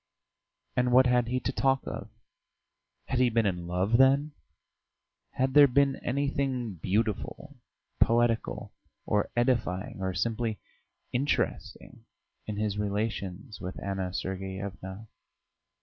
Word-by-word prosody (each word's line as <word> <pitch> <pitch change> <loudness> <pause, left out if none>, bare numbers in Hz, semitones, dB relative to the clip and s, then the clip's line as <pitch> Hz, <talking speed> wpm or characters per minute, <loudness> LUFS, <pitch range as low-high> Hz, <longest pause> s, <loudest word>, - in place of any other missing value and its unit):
And 125 0 +2
what 130 +1 +7
had 125 -1 +3
he 130 +1 0
to - - -1
talk 135 0 +2
of? - - -6 1.0
Had 130 - -1
he 125 -1 +4
been 115 -1 +2
in 90 -3 -1
love, 95 +7 +1
then? 140 +3 +5 1.0
Had 130 0 0
there 145 -1 +9
been 140 +1 +3
anything 135 -3 -1
beautiful, 110 - -2 0.4
poetical, 115 0 +2 0.3
or 105 -1 +1
edifying 115 -7 0
or 95 -1 -2
simply 110 +3 -1 0.5
interesting 135 +4 -2 0.4
in 105 -1 -4
his 105 -1 -1
relations 105 0 -3
with 90 +1 -5
Anna 95 -2 -3
Sergeyevna? 95 +2 -5
115 Hz, 115 wpm, -29 LUFS, 95-130 Hz, 1.0 s, there